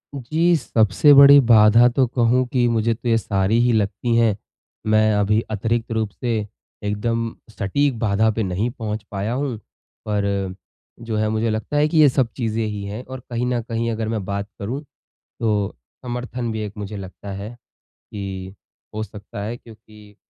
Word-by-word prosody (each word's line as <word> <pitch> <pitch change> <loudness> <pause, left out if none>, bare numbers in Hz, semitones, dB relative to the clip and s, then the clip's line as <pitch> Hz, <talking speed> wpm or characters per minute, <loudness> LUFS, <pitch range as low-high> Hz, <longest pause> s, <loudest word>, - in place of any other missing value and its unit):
जी, 160 +6 +1
सबसे 115 - +4
बड़ी 140 0 +9
बाधा 115 +2 +7
तो 130 +2 +2
कहूँ 120 +1 +2
कि 125 -1 +1
मुझे 115 0 +1
तो 120 - -7
ये 115 - +4
सारी 105 +1 +1
ही 120 - +3
लगती 110 +3 0
हैं, 115 -3 +3 0.5
मैं 110 0 +4
अभी 105 +1 +2
अतिरिक्त 115 +3 -1
रूप 110 -2 -1
से 120 0 -2 0.5
एकदम 115 +2 -2
सटीक 115 +6 0
बाधा 110 0 +2
पे 110 0 -2
नहीं 95 +5 -1
पहुँच 110 -4 -5
पाया 100 +3 -2
हूँ, 130 -2 -2 0.5
पर 100 -2 -1 0.5
जो 115 -2 -4
है 110 0 +1
मुझे 110 +1 0
लगता 110 +7 -2
है 150 +1 +4
कि 160 - -1
ये 145 - +7
सब 125 -3 0
चीज़ें 115 -2 -1
ही 105 -1 -4
हैं 105 +5 -6
और 130 0 -8
कहीं 120 0 -2
न 120 - 0
कहीं 115 0 -2
अगर 110 0 -3
मैं 110 -3 -2
बात 100 +1 -4
करूँ 120 +8 -4 0.6
तो 105 -3 0 0.3
समर्थन 125 -1 -4
भी 110 -1 -3
एक 105 - -7
मुझे 105 0 -6
लगता 95 +1 -8
है 100 +5 -7 0.6
कि, 95 -1 -6 0.4
हो 110 - -2
सकता 100 -1 -9
है। 115 +3 -4
क्योंकि 105 -3 -17
110 Hz, 175 wpm, -21 LUFS, 105-120 Hz, 0.6 s, बड़ी